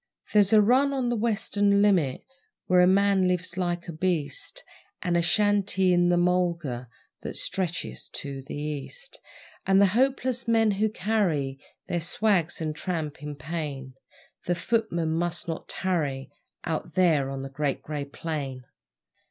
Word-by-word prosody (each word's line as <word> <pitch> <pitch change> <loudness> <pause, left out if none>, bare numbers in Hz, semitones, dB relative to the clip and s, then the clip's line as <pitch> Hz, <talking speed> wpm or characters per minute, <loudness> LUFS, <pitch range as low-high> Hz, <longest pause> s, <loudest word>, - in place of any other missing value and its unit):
There's 205 -2 +5
a 215 -1 +7
run 265 +6 +3
on 260 -3 0
the 240 - 0
Western 205 -2 +2
limit 175 -11 +2 0.4
Where 180 0 +4
a 180 - +6
man 195 0 +4
lives 180 -1 -1
like 175 -1 -2
a - - -4
beast, 185 - -2 0.4
And 175 -2 0
a 170 - +3
shanty 195 0 +2
in 175 0 +3
the 175 - +3
mulga 170 -9 0 0.3
That - - -6
stretches 180 -3 -3
to 140 -2 -5
the 135 - -8
East; 150 - -6 0.5
And 195 0 +5
the 200 - +7
hopeless 255 -1 +1
men 225 -2 +4
who 210 +2 +1
carry 180 -11 0 0.3
Their 175 - -2
swags 180 0 +1
and 155 -2 -3
tramp 155 -6 -4
in 150 0 -6
pain 140 -2 -5 0.5
The 175 - +1
footmen 175 -7 0
must 175 +2 -2
not 165 -1 -5
tarry 145 -8 -1 0.3
Out 160 -1 -4
there 160 -7 +3
on 135 0 -5
the 135 - -6
Great 140 0 -2
Grey 145 -2 -4
Plain. 140 -3 -5
175 Hz, 150 wpm, -26 LUFS, 150-205 Hz, 0.5 s, a